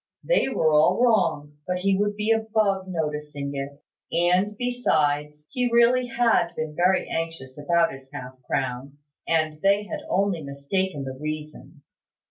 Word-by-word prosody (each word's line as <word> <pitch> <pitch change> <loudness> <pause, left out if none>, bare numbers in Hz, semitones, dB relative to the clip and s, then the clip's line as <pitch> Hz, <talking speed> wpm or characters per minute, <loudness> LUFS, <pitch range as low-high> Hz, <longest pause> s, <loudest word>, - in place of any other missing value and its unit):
They - - +2
were 160 -11 +2
all 155 +6 +4
wrong, 165 -11 +1
but 180 - 0
he 195 0 +2
would 205 +1 0
be 215 +2 0
above 215 -4 +1
noticing 150 -4 -3
it; 140 +1 -6 0.3
and, 180 +5 +2
besides, 150 -12 0
he 250 -1 0
really 240 +2 +4
had 240 -2 +2
been 155 -1 -4
very 180 +3 +2
anxious 165 -6 -4
about 170 +3 +2
his 135 0 -12
half 130 +1 -9
crown, 130 +1 -3 0.3
and 155 -2 0
they 200 +1 +3
had 205 - -5
only 195 -3 +1
mistaken 140 +4 -2
the 135 -1 -5
reason. 155 0 -7
165 Hz, 145 wpm, -25 LUFS, 145-205 Hz, 0.3 s, all